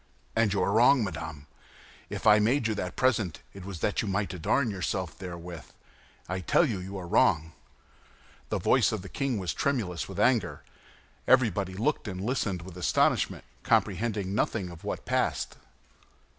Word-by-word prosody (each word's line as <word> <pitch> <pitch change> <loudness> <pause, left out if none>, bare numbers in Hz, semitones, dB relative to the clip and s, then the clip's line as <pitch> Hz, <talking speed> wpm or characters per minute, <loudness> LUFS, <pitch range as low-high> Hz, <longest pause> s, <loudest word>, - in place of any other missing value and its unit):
"And 115 -2 +3
you 100 - +1
were 95 - +1
wrong, 120 +4 +5
madame. 80 -6 -5 0.6
If - - -6
I 105 0 +7
made 120 +5 +2
you 110 - 0
that 90 -4 -4
present 110 -10 +1
it 95 - -10
was 95 -3 -7
that 105 - +1
you 110 - -4
might 100 0 -1
adorn 110 - +1
yourself 95 -2 -3
therewith. 85 -5 -8 0.6
I 90 +1 -2
tell 90 - +3
you 110 -10 -2
that - - -6
you 95 - -8
were 95 -3 -5
wrong." 80 -2 +3 1.0
The - - 0
voice - - +3
of - - -3
the 95 - -9
king 135 -4 -1
was 95 -3 -2
tremulous 105 - -1
with - - -6
anger. - - +2 0.6
Everybody 105 -7 +3
looked 140 +8 -1
and 95 -2 -5
listened 100 -5 -1
with 90 0 -10
astonishment, 90 - +1 0.2
comprehending 100 -1 +1
nothing 100 -3 -1
of 85 - -12
what - - -4
passed. - - -1
95 Hz, 170 wpm, -28 LUFS, 90-110 Hz, 1.0 s, I